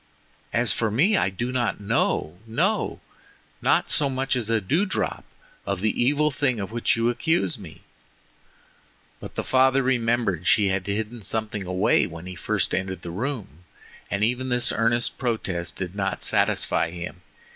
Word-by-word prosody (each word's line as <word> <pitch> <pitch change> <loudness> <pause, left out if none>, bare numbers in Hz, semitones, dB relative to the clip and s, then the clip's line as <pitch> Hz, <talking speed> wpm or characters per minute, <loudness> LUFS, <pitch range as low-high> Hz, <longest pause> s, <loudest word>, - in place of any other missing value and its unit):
As 120 -3 +3
for 110 - 0
me 160 - +3
I 95 - +2
do 120 +7 -3
not 125 -2 -1
know—no, 105 +1 0 0.6
not - - +2
so 145 -2 +5
much 135 0 -1
as 115 -3 -2
a 115 -1 +3
dew 145 - +1
drop, 205 - -2 0.4
of 100 -2 -3
the 110 +2 +1
evil 145 +4 +2
thing 130 -4 0
of 100 +1 -4
which 120 0 +1
you 115 +1 +2
accuse 160 0 0
me." 85 -6 -11 1.4
But - - -9
the - - -2
father 130 +1 +3
remembered 120 -7 +1
that 90 - -6
she 100 -1 +4
had 95 0 -1
hidden 110 +3 -3
something 105 -2 -2
away 90 0 +2
when 85 +1 -9
he 90 - -6
first 85 - -1
entered 95 -1 -2
the 85 - -5
room, 100 - -5 0.4
and 100 +2 -1
even 125 +3 0
this 125 -1 +1
earnest 115 +2 0
protest 95 -9 -2
did 90 -2 -4
not 100 -1 -2
satisfy 80 0 +2
him. 85 +1 -7
110 Hz, 165 wpm, -25 LUFS, 95-125 Hz, 1.4 s, so